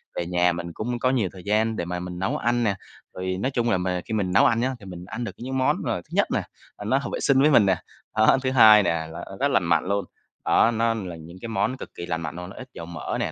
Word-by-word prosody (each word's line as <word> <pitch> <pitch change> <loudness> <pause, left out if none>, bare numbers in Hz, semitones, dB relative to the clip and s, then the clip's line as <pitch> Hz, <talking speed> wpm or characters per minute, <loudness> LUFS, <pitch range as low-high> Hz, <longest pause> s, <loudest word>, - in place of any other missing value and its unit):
về 85 - -2
nhà 90 0 +2
mình 85 0 -5
cũng 120 +5 -3
có 130 - +2
nhiều 120 -8 +1
thời 95 -2 -11
gian 110 +2 +1
để 85 - -3
mà 90 +1 -3
mình 90 0 -6
nấu 95 - -1
ăn 120 +1 +1
nè, 105 -3 +1 0.4
rồi 95 0 -3
nói 130 - 0
chung 120 -3 0
là 110 - +3
mà 90 0 -1
khi - - -5
mình 100 -4 0
nấu 100 - +6
ăn 115 - +3
nhá, 130 +2 0
thì 100 - -13
mình 90 -2 -8
ăn 110 +5 -5
được 115 - -4
những 130 +2 -4
món, 130 - +2
ờ, - - -1
thứ - - -29
nhất - - +2
nè, - - +1 0.4
là 105 - -8
nó 130 +6 +2
hợp 140 - -3
vệ - - -2
sinh 135 -1 +3
với 150 +2 +5
mình 115 -7 +6
nè. 95 -1 +3 0.4
Đó, 110 +4 +5
thứ 130 - +1
hai 110 -5 +8
nè 90 - +2 0.2
là 85 +1 -7
rất 140 - +3
lành 100 - +3
mạnh 85 -1 +2
luôn, 100 0 0 0.4
đó, 115 - +4
nó 115 0 +1
là 95 -6 -5
những 80 +2 -11
cái 115 - -6
món 120 +3 0
cực - - -8
kỳ 85 - -6
lành 80 -1 -3
mạnh 75 -2 -5
luôn, 90 +1 -7
nó - - -11
ít 130 - -9
dầu 85 - -7
mỡ 85 -2 -4
nè, - - -1
100 Hz, 300 wpm, -24 LUFS, 90-120 Hz, 0.4 s, hai